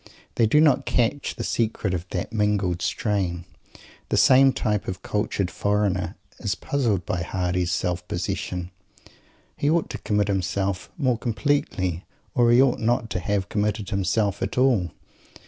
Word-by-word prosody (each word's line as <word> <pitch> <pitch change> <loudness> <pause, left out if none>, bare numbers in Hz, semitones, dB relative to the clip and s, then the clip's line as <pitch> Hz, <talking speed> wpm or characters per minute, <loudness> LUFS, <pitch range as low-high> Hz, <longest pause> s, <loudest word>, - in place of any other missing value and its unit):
They 115 - +3
do 150 +8 +4
not 155 -3 +4
catch 125 +4 0
the - - -4
secret 110 -4 -1
of 90 +1 -3
that - - -4
mingled 105 -5 +1
strain. 90 -6 -1 0.6
The - - +1
same 135 +1 +6
type 105 -5 -1
of 90 -1 -5
cultured 105 -3 -1
"foreigner" 100 -3 0 0.2
is 100 -1 -1
puzzled 110 -11 -1
by 90 - -2
Mr. - - -3
Hardy's 90 -1 -1
self 90 -1 -2
possession. 90 0 -3 0.8
He 145 - 0
ought 165 0 +1
to - - -5
commit 105 -1 0
himself 95 -1 -1
more 130 -7 +1
completely, 100 - -1 0.3
or 120 -1 +4
he 120 +1 +6
ought 135 -2 +4
not 115 0 0
to - - -1
have 95 +1 -1
committed 105 0 -1
himself 100 +1 0
at - - -3
all! 125 -9 +3
105 Hz, 155 wpm, -24 LUFS, 90-115 Hz, 0.8 s, same